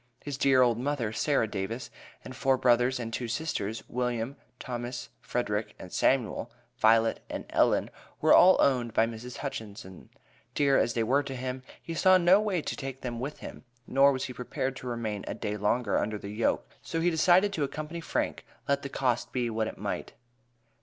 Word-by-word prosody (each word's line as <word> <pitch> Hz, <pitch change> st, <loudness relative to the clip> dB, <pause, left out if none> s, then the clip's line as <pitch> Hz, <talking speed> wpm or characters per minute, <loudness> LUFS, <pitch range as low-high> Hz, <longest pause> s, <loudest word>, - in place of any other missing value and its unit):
His 145 Hz, -1 st, -4 dB
dear 135 Hz, -1 st, +4 dB
old 120 Hz, -2 st, +2 dB
mother, 125 Hz, -5 st, -1 dB
Sarah 140 Hz, -2 st, +1 dB
Davis, 105 Hz, +4 st, -4 dB, 0.3 s
and 130 Hz, -, -8 dB
four 135 Hz, 0 st, +2 dB
brothers 125 Hz, +1 st, +3 dB
and 115 Hz, -1 st, -5 dB
two 120 Hz, -, -2 dB
sisters, 115 Hz, -5 st, -3 dB
William, 125 Hz, +1 st, -2 dB, 0.2 s
Thomas, 120 Hz, 0 st, -5 dB
Frederick 105 Hz, -3 st, -2 dB
and 90 Hz, -, -11 dB
Samuel, 130 Hz, -5 st, +1 dB, 0.3 s
Violet 115 Hz, +1 st, +4 dB
and -, -, -5 dB
Ellen, -, -, +2 dB, 0.3 s
were -, -, +5 dB
all 185 Hz, +1 st, +7 dB
owned 120 Hz, -4 st, +2 dB
by 110 Hz, -, +5 dB
Mrs. 115 Hz, +2 st, -7 dB
Hutchinson. 100 Hz, -, -7 dB, 0.5 s
Dear 140 Hz, -2 st, +4 dB
as 120 Hz, -, +1 dB
they 115 Hz, -, +1 dB
were 135 Hz, +6 st, +3 dB
to 135 Hz, -2 st, -6 dB
him, 130 Hz, +1 st, -4 dB, 0.2 s
he 165 Hz, -, -7 dB
saw 185 Hz, +3 st, +5 dB
no 185 Hz, +3 st, +5 dB
way 190 Hz, -7 st, -1 dB
to -, -, -3 dB
take 135 Hz, -1 st, -6 dB
them 120 Hz, -2 st, -4 dB
with 140 Hz, +4 st, -5 dB
him, -, -, -9 dB, 0.2 s
nor 135 Hz, +3 st, +5 dB
was 130 Hz, -1 st, -2 dB
he 125 Hz, -, -6 dB
prepared 130 Hz, +1 st, -3 dB
to 125 Hz, -, -8 dB
remain 110 Hz, -4 st, -3 dB
a -, -, -3 dB
day 105 Hz, -1 st, -3 dB
longer 105 Hz, +2 st, +1 dB
under 105 Hz, 0 st, -2 dB
the 100 Hz, -, -8 dB
yoke; 110 Hz, +2 st, 0 dB
so 165 Hz, -, -3 dB
he 175 Hz, +2 st, +2 dB
decided 180 Hz, +5 st, +4 dB
to 155 Hz, -, -1 dB
accompany 155 Hz, +4 st, -5 dB
Frank, -, -, -2 dB, 0.2 s
let 140 Hz, 0 st, +1 dB
the 140 Hz, -, -6 dB
cost 125 Hz, -3 st, -1 dB
be 120 Hz, -2 st, -1 dB
what 110 Hz, 0 st, -1 dB
it -, -, -7 dB
might. -, -, -4 dB
125 Hz, 190 wpm, -29 LUFS, 115-140 Hz, 0.5 s, all